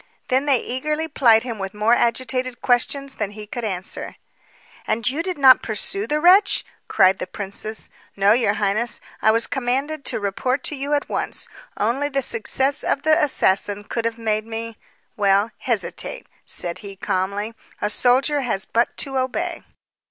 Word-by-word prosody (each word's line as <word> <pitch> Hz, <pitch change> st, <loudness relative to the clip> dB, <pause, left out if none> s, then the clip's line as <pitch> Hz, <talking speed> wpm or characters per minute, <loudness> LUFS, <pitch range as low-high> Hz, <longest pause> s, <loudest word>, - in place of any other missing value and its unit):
Then 265 Hz, +2 st, +1 dB
they 275 Hz, -3 st, +5 dB
eagerly 300 Hz, +7 st, -2 dB
plied 230 Hz, -7 st, +4 dB
him 235 Hz, -4 st, -5 dB
with 195 Hz, +1 st, -5 dB
more 215 Hz, +3 st, +3 dB
agitated 255 Hz, +1 st, 0 dB
questions 270 Hz, +3 st, +1 dB
than 210 Hz, -5 st, -3 dB
he 210 Hz, +1 st, -9 dB
could 240 Hz, +3 st, -6 dB
answer. 190 Hz, -4 st, -4 dB, 0.7 s
"And 220 Hz, +2 st, 0 dB
did 290 Hz, -, 0 dB
you 370 Hz, -, 0 dB
not 260 Hz, -2 st, +7 dB
pursue 395 Hz, -, 0 dB
the 300 Hz, -, 0 dB
wretch?" 365 Hz, +5 st, +5 dB, 0.2 s
cried 190 Hz, 0 st, +4 dB
the -, -, -4 dB
princess. 210 Hz, +2 st, -5 dB, 0.3 s
"No, 200 Hz, +1 st, +4 dB
your 220 Hz, -3 st, +3 dB
highness. 215 Hz, +3 st, 0 dB, 0.2 s
I -, -, +4 dB
was 230 Hz, +1 st, +3 dB
commanded 275 Hz, +3 st, -2 dB
to -, -, -1 dB
report 250 Hz, +7 st, -1 dB
to 300 Hz, -, -1 dB
you 285 Hz, +2 st, -1 dB
at 285 Hz, -, -2 dB
once. -, -, -3 dB, 0.3 s
Only 255 Hz, +7 st, 0 dB
the 275 Hz, -1 st, -1 dB
success 265 Hz, +5 st, +1 dB
of 280 Hz, -, 0 dB
the 315 Hz, +1 st, +4 dB
assassin 205 Hz, -6 st, +1 dB
could 230 Hz, +2 st, -3 dB
have 230 Hz, 0 st, -1 dB
made 215 Hz, -1 st, -1 dB
me 225 Hz, 0 st, -5 dB, 0.4 s
well, 200 Hz, +2 st, +2 dB
hesitate," -, -, -3 dB, 0.2 s
said 170 Hz, -1 st, -3 dB
he 200 Hz, -1 st, -9 dB
calmly. 200 Hz, +4 st, -2 dB, 0.3 s
"A -, -, 0 dB
soldier 260 Hz, +6 st, +2 dB
has 215 Hz, -7 st, 0 dB
but 235 Hz, +1 st, 0 dB
to 270 Hz, -2 st, -2 dB
obey." 335 Hz, +7 st, -2 dB
240 Hz, 165 wpm, -22 LUFS, 210-275 Hz, 0.7 s, not